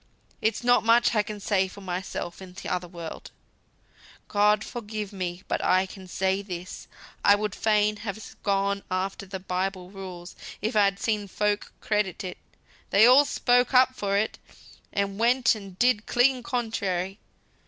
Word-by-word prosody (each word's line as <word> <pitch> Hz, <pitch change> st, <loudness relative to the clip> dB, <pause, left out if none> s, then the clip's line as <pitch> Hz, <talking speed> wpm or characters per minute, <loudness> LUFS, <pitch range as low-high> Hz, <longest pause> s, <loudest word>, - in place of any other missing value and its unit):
It's 220 Hz, +2 st, 0 dB
not 245 Hz, -1 st, +4 dB
much 235 Hz, +2 st, +4 dB
I 215 Hz, -, +3 dB
can 210 Hz, 0 st, -7 dB
say 195 Hz, -2 st, +1 dB
for 200 Hz, +2 st, -12 dB
myself 180 Hz, -1 st, -5 dB
in 185 Hz, -1 st, -11 dB
t'other 180 Hz, -2 st, -3 dB
world, 170 Hz, -2 st, -8 dB, 1.0 s
God 210 Hz, +1 st, +3 dB
forgive 215 Hz, -3 st, -6 dB
me; 180 Hz, -1 st, -4 dB
but -, -, -1 dB
I 185 Hz, +1 st, +3 dB
can 190 Hz, 0 st, -11 dB
say 190 Hz, +2 st, 0 dB
this, 180 Hz, -2 st, -7 dB, 0.4 s
I 200 Hz, -, +7 dB
would 210 Hz, -1 st, -2 dB
fain 210 Hz, -1 st, +2 dB
have 210 Hz, 0 st, -7 dB
gone 200 Hz, 0 st, +1 dB
after 190 Hz, +1 st, -2 dB
the 190 Hz, 0 st, -5 dB
Bible 185 Hz, 0 st, -3 dB
rules 185 Hz, -3 st, -9 dB, 0.2 s
if 220 Hz, +3 st, -2 dB
I'd 200 Hz, -2 st, +4 dB
seen 210 Hz, -2 st, -1 dB
folk 210 Hz, +1 st, -1 dB
credit 210 Hz, -4 st, -1 dB
it; 185 Hz, -, -6 dB, 0.5 s
they 205 Hz, +3 st, +6 dB
all 260 Hz, +4 st, +7 dB
spoke 245 Hz, -1 st, +2 dB
up 255 Hz, 0 st, +6 dB
for 200 Hz, -4 st, -1 dB
it, 215 Hz, +2 st, -1 dB, 0.5 s
and 200 Hz, 0 st, -1 dB
went 240 Hz, +1 st, +4 dB
and 195 Hz, -4 st, -9 dB
did 240 Hz, -2 st, +2 dB
clean 250 Hz, +1 st, +3 dB
contrary. 200 Hz, -6 st, -2 dB
200 Hz, 155 wpm, -26 LUFS, 190-220 Hz, 1.0 s, I